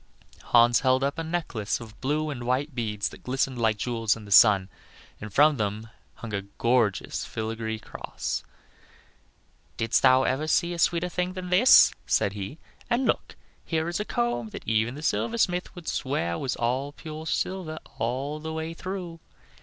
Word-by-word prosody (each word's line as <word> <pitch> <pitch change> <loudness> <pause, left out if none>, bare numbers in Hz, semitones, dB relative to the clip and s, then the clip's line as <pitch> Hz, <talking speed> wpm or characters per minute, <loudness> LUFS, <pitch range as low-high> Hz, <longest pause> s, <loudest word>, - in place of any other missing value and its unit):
Hans 120 0 +5
held 130 0 +2
up 140 +3 -1
a - - -2
necklace 160 -11 -2
of 110 -2 -12
blue 150 +3 0
and 125 -4 -6
white 130 +5 -1
beads 105 -4 -2
that - - -14
glistened 130 0 -1
like 110 -2 +2
jewels 115 -1 0
in 110 -2 -11
the 100 - -12
sun, 100 -2 +7 0.5
and 110 -1 -8
from 145 +6 +5
them 110 +1 -3 0.2
hung 115 -3 -8
a 100 - -1
gorgeous 110 +1 0
filigree 110 0 -4
cross. 110 - -5 1.3
"Didst 115 - +2
thou 130 0 +6
ever 140 +5 0
see 170 +2 +2
a 170 - -6
sweeter 170 +1 +2
thing 180 +1 -2
than 185 -1 -6
this?" 210 +8 +7
said 100 - +2
he; 100 +7 -6 0.3
"and 245 +2 +1
look, - - -1 0.3
here 160 -1 -1
is 175 +2 -2
a - - 0
comb 120 - -1
that - - -9
even 110 +3 +1
the 150 - -8
silversmith 185 -2 0
would 175 -3 -10
swear 85 - -1
was 130 - -2 0.4
pure 155 0 -7
silver 175 -3 -2 0.2
all 135 +6 -2
the 160 +1 -5
way 160 +1 -4
through." 180 -1 -6
130 Hz, 170 wpm, -26 LUFS, 110-160 Hz, 1.3 s, sun